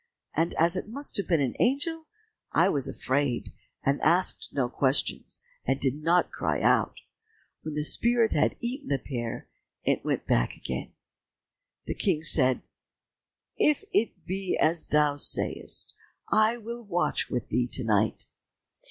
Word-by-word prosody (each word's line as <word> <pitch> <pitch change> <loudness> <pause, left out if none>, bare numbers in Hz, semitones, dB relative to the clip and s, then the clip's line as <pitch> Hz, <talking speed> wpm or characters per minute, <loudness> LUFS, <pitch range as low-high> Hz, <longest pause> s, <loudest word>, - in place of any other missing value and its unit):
And 165 +2 0
as 170 +3 +3
it 185 - -4
must 280 +5 -4
have 200 - -2
been 165 -4 +2
an 130 -3 0
angel, 315 +5 0 0.4
I 170 +4 +4
was 140 -7 0
afraid, 130 -2 -1 0.3
and 140 +1 +1
asked 175 +3 +1
no 130 -3 0
questions, 130 +2 0 0.2
and 135 +1 0
did 135 +2 0
not 170 +3 +2
cry - - -1
out. - - +2 0.7
When 155 -1 -6
the 150 - -1
spirit 235 +7 +2
had - - +2
eaten 250 +4 -4
the 140 - +1
pear, 120 -3 -5 0.4
it - - +1
went - - -1
back - - +1
again." 65 +1 -5 0.9
The - - -3
King 155 - 0
said, 130 -5 +4 0.9
"If 300 +6 +3
it 225 - 0
be 190 0 -2
as 165 +1 +2
thou 150 -1 +2
sayest, - - +2 0.3
I 220 +2 +3
will 235 +1 -7
watch 180 -6 -1
with 125 -5 -3
thee 120 +1 +1
to 130 - +1
night." 110 -1 +1
155 Hz, 150 wpm, -27 LUFS, 135-215 Hz, 0.9 s, I